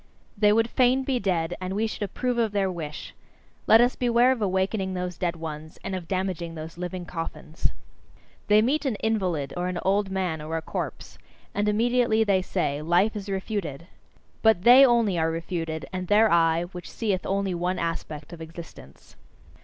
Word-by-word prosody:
They 210 -1 +4
would 225 +2 +3
fain 255 +2 +3
be 260 -2 0
dead, 175 -4 -1
and 185 +1 -3
we 215 +2 +1
should 220 - -5
approve 240 +5 -1
of 225 -3 +1
their 195 -2 +1
wish! 155 -4 -7 0.5
Let 225 +1 +8
us 245 +1 +3
beware 245 +1 +3
of 255 -4 -1
awakening 190 0 0
those 180 -1 -3
dead 175 -1 -1
ones, 155 -1 -7
and 195 - -4
of 180 -3 -6
damaging 185 -3 -2
those 160 +1 -7
living 180 +1 -5
coffins! 165 -1 -4 0.8
They 210 +1 +5
meet 285 +7 +1
an 265 -6 0
invalid, 185 -11 -1
or 175 0 -2
an 180 -1 -3
old 195 +1 +1
man, 185 -5 -2
or 160 +2 -3
a - - -3
corpse - - -5 0.3
and 205 +1 +1
immediately 230 +1 +2
they 195 -3 +2
say: 150 -6 -2
"Life 175 +7 +2
is 205 -1 -6
refuted!" 190 -6 -3 0.6
But 220 -5 +4
they 250 +4 +9
only 230 -8 +3
are 160 0 +2
refuted, 165 -1 -4
and 185 -1 -3
their 215 +3 +5
eye, 165 0 +3
which 180 -1 -8
seeth 200 -5 -2
only 195 -1 0
one 180 +1 -1
aspect 160 -1 -4
of 165 - -9
existence. 160 - -12
190 Hz, 180 wpm, -26 LUFS, 165-220 Hz, 0.8 s, they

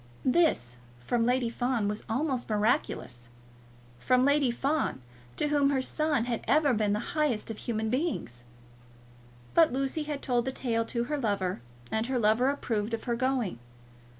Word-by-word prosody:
This, 255 - +2 0.2
from 230 - 0
Lady 250 -2 +1
Fawn, 245 -3 0
was 210 +1 -3
almost 255 +1 -1
miraculous, 210 - -1 0.7
from 255 - +3
Lady 285 -2 +3
Fawn, 275 - -1 0.4
to 295 - 0
whom 290 -1 +3
her 270 -2 +1
son 300 -4 0
had 240 -2 -2
ever 290 -2 +4
been 210 -2 +1
the 210 +3 -3
highest 290 -9 0
of 220 - -7
human 220 -2 -2
beings! 255 - -2 1.1
But 330 -2 +5
Lucy 270 +4 -1
had 295 -1 -4
told 245 -2 +1
the 265 - -1
tale 230 -3 -1
to 235 +1 -2
her 295 +4 -2
lover, 195 - -1 0.3
and 220 +1 0
her 260 -1 0
lover 230 +3 +3
approved 230 -5 -1
of 225 - -10
her 240 -2 -1
going. 250 - -1
245 Hz, 160 wpm, -29 LUFS, 220-275 Hz, 1.1 s, But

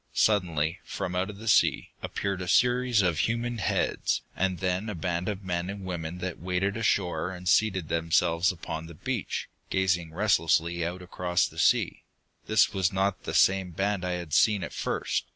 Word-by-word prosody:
Suddenly, 85 -7 +2
from 90 - -4
out 90 +2 0
of 105 - -8
the 110 +2 -9
sea, - - +3
appeared 100 -2 -3
a 90 - -4
series 125 +1 +3
of 85 -4 +1
human 115 +4 -1
heads, - - 0
and 95 -1 0
then 95 +4 -1
a 105 - -4
band 90 +2 -2
of 100 -1 -4
men 90 -1 -2
and 100 -1 -6
women 85 -2 -4
that 90 -1 -5
waded 95 +3 -1
ashore 100 -5 0
and 90 -1 -8
seated 95 -3 +2
themselves 85 +2 +2
upon 80 -2 -6
the 85 - -11
beach, - - -3 0.2
gazing 90 -3 0
restlessly 85 -3 +2
out 90 +2 -4
across 90 0 0
the - - -10
sea. - - +2 0.5
This 110 -4 +4
was 95 -1 +1
not 95 0 -1
the - - -3
same 95 -1 +4
band 100 +1 -1
I 90 0 -1
had 85 -4 -5
seen 105 -3 +4
at - - -6
first. - - -2
90 Hz, 180 wpm, -28 LUFS, 85-100 Hz, 0.5 s, This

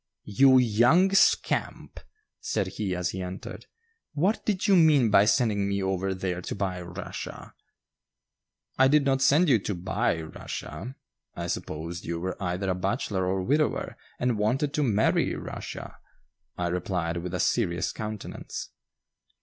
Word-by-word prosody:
"You 130 +6 +5
young 125 - +4
scamp!" 195 - +1 0.4
said 105 -3 -1
he 95 -1 -3
as 90 0 -1
he 95 - -5
entered; 90 +1 -7 0.5
"what 180 +9 +1
did 200 -4 0
you 200 - +5
mean 150 - +5
by 100 0 +6
sending 105 -4 +2
me 100 -1 -1
over 95 0 -1
there 90 -1 -3
to - - -5
buy 95 -3 -2
Russia?" 90 +2 -8 1.3
"I 130 - +7
did 145 +1 +3
not 135 -1 +2
send 150 +6 +4
you 125 -7 +4
to 100 0 -3
buy 85 -1 -1
Rushia; 80 - -7 0.4
I - - -4
supposed 85 +3 -5
you 85 0 -3
were 95 +3 -4
either 90 +1 -1
a - - +2
bachelor 95 0 -1
or 95 0 0
widower 150 +8 0 0.2
and 125 -3 0
wanted 135 +8 0
to 150 - 0
marry 110 -6 +2
Rushia," - - -7 0.6
I 90 -1 -1
replied, 90 -1 -2
with 90 +1 -4
a - - -2
serious 90 -7 0
countenance. 110 -1 -6
100 Hz, 150 wpm, -27 LUFS, 90-130 Hz, 1.3 s, I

